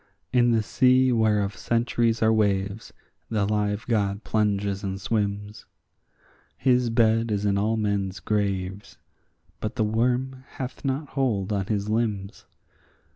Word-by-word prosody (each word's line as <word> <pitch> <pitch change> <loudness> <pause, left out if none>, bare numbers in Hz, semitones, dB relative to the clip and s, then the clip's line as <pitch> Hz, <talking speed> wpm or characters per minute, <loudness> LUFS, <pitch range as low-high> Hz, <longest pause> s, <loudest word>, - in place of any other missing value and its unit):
In 120 -1 +4
the 115 -2 +2
sea 130 +3 +3
whereof 105 -4 +1
centuries 115 +2 0
are 110 0 +4
waves 100 0 0 0.4
the 105 -3 0
live 105 0 -1
God 105 -3 0
plunges 100 -2 0
and 95 0 -3
swims; 105 0 -3 0.9
His 125 -2 +2
bed 115 0 +2
is 105 -1 -1
in 100 -1 +2
all 110 +3 +1
men's 100 -2 -1
graves, 100 -2 -2 0.6
but 110 - -4
the - - +1
worm 125 +4 0
hath 130 -1 -6
not 135 +1 -2
hold 110 -8 -1
on 95 -2 -1
his 105 -1 -1
limbs. 105 -3 -2
105 Hz, 130 wpm, -25 LUFS, 100-115 Hz, 0.9 s, In